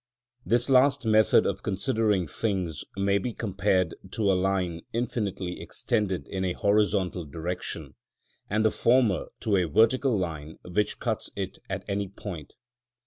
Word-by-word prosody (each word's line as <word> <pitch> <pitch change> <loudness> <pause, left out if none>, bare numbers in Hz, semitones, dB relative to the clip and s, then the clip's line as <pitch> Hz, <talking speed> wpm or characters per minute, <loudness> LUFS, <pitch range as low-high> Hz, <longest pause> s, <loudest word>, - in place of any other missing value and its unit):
This 120 +1 +2
last 135 0 +4
method 110 -2 +5
of - - -1
considering 100 0 +1
things 90 -5 -2
may 100 0 +2
be 120 +4 -3
compared 95 -4 0 0.2
to 105 -3 +2
a - - +4
line 90 -3 0
infinitely 105 -6 -2
extended 105 -6 -1
in 95 -1 -3
a 90 -1 0
horizontal 100 -3 +1
direction, 85 +4 -5 0.6
and 110 +2 +1
the 110 - +4
former 120 -6 +3
to 105 -3 +2
a 90 - +2
vertical 115 - +3
line 80 -4 -4
which 105 +4 -1
cuts - - -2
it - - -4
at - - -4
any 100 0 -1
point. 90 -6 -8
100 Hz, 140 wpm, -27 LUFS, 90-110 Hz, 0.6 s, method